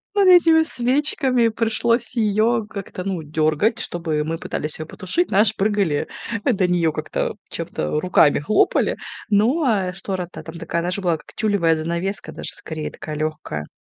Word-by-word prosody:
Вот 400 -2 +4
этими 330 -3 +7
свечками 255 -3 +1
пришлось 230 +2 0
ее 220 +1 +2
как-то, 195 -3 -6
ну, 185 -4 -2
дёргать, 155 +8 +1
чтобы 160 -6 -1
мы 165 +1 -3
пытались 150 0 -4
ее 155 - -4
потушить. 270 - -1
Знаешь, 210 +2 +3
прыгали 195 -7 +1 0.4
до 200 -8 +2
нее 170 -3 +2
как-то, - - -3
чем-то, 75 - -2
руками 155 -5 +4
хлопали. 145 +9 +2 0.3
Ну, 230 +11 +3
а 195 -7 +1
штора 185 -1 -4
то 155 - -8
там 165 +1 -9
такая, 170 0 -2
знаешь, 180 +3 -2
была, 175 -4 +1
как - - -17
тюлевая 200 -7 +2
занавеска 170 +5 -3
даже - - -7
скорее, 155 -1 -5
такая 155 -1 -7
легкая. 155 - -4
190 Hz, 155 wpm, -21 LUFS, 160-225 Hz, 0.4 s, этими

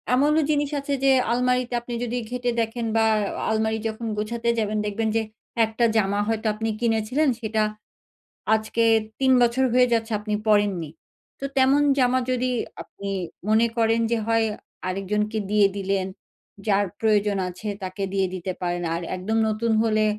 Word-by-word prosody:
এমনও 300 +4 +3
জিনিস 290 -1 +1
আছে 280 0 -3
যে 270 - +5 0.2
আলমারিতে 250 0 +1
আপনি 240 0 -7
যদি 245 0 -2
ঘেঁটে 245 0 -1
দেখেন 230 +1 -3
বা, 225 - +4 0.2
আ - - -4 0.2
আলমারি 220 0 0
যখন 225 +1 -5
গুছাতে 230 +2 -2
যাবেন, 215 -1 -1
দেখবেন 210 +2 -1
যে 225 - +3 0.4
একটা 220 +2 0
জামা 200 -1 +1
হয়তো 225 0 -1
আপনি 225 +1 -3
কিনেছিলেন, 235 +6 +1
সেটা 220 -1 0 0.9
আজকে 220 +1 -1 0.4
৩ 265 -1 +3
বছর 240 +2 +3
হয়ে 250 0 +5
যাচ্ছে 225 0 0
আপনি 210 0 -4
পরেননি। 205 -6 +2 0.5
তো 275 - -4
তেমন 270 +2 +5 0.2
জামা 255 0 +3
যদি 255 0 0 0.3
আপনি 200 0 -8 0.4
মনে 220 +2 +4
করেন 225 0 +3
যে, 235 - +2
হয় 225 0 +3 0.4
আরেকজনকে 210 +3 -1
দিয়ে 210 -1 +5
দিলেন, 195 -1 -1 0.6
যার 205 0 +3
প্রয়োজন 210 -2 +2
আছে 180 +4 -8 0.2
তাকে 185 +1 -4
দিয়ে 195 -1 +1
দিতে 185 +1 -4
পারেন। 175 0 -2
আর 170 - -3
একদম 200 +5 -2
নতুন 220 +2 0
হলে 215 -1 +2
220 Hz, 160 wpm, -24 LUFS, 210-240 Hz, 0.9 s, যে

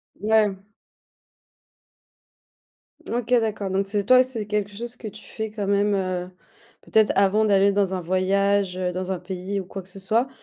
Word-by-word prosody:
Ouais. 210 -1 +2 2.5
OK 240 0 -3
d'accord, 210 -3 -2
donc 195 +1 0
c'est 205 0 -1
toi, 255 +2 +7
c'est 230 -5 -5
quelque 205 -1 -2
chose 240 +2 -5
que 220 - -7
tu 210 0 -10
fais 220 -1 -5
quand 205 -2 -4
même, 200 +1 +2
heu, 185 -1 -2 0.5
peut-être, 220 -1 +3
avant 200 +2 +3
d'aller 200 -1 +4
dans 195 -1 +1
un 185 - -2
voyage, 190 +1 +1
heu, 180 -1 -1
dans 185 +1 -4
un 180 - -5
pays 190 +2 -4
ou - - -10
quoi 195 +1 -7
que - - -18
ce 195 +1 -11
soit. 225 +6 +1
200 Hz, 175 wpm, -24 LUFS, 190-215 Hz, 2.5 s, toi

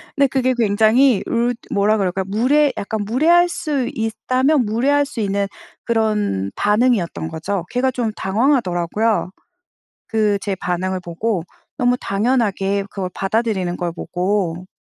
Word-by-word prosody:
근데 280 -1 +4
그게 260 -1 +1
굉장히 220 +2 +3
읏 240 +1 0 0.2
뭐라 205 +2 +2
그럴까요? 190 -1 -1
무례 265 +8 +3
약간 210 +1 -3
무례할 330 - +4
수 285 -7 -2
있다면 255 +4 +1
무례할 275 +7 +2
수 270 - -8
있는 200 -1 0 0.4
그런 210 - 0
반응이었던 210 -6 +1
거죠. 170 +3 -3
걔가 255 +1 +1
좀 235 -3 -2
당황하더라고요. 210 - 0 0.8
그 215 -2 +1
제 200 - -1
반응을 185 +1 -2
보고 180 +3 -2 0.4
너무 245 -1 +2
당연하게 200 -2 0
그걸 185 -2 -4
받아들이는 195 -3 -1
걸 175 -1 -3
보고. 180 0 -2
215 Hz, 295 characters per minute, -20 LUFS, 190-250 Hz, 0.8 s, 근데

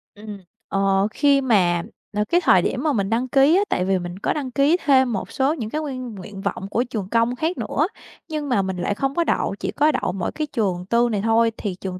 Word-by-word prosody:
Ừm, 210 -1 -9 0.3
ờ, 195 0 +2
khi 280 +3 +3
mà, 180 -9 +2 0.4
ờ, 210 - +3
cái 350 +1 +3
thời 185 - +5
điểm 250 +8 -2
mà 305 -3 +1
mình 200 -3 -1
đăng 240 +3 0
ký 275 +6 +4
á, 390 - +4
tại 180 - 0
vì 190 -1 +1
mình 175 +2 -7
có - - 0
đăng 275 -4 -4
ký 285 +7 +3
thêm 260 -4 +4
một 195 - -4
số 275 +3 +1
những 230 -9 -5
cái 310 +4 -2
nguyên 255 -6 -5
nguyện 195 +1 -9
vọng 195 - -3
của 235 - +1
trường 205 -5 -4
công 230 +2 +1
khác 320 +7 -2
nữa, 310 +4 0 0.4
nhưng 300 -2 -3
mà 240 -5 +2
mình 190 -1 -3
lại 200 +3 -1
không 270 +3 -2
có 340 - +2
đậu, 200 - 0
chỉ - - -3
có 300 +2 +3
đậu - - -1
mỗi 180 -1 -3
cái 305 -1 -3
trường 185 -5 -1
tư 235 +3 +2
này 205 -2 -1
thôi, 225 +1 +3
thì 200 -4 -4
trường 185 0 -6
230 Hz, 250 wpm, -22 LUFS, 195-275 Hz, 0.4 s, thời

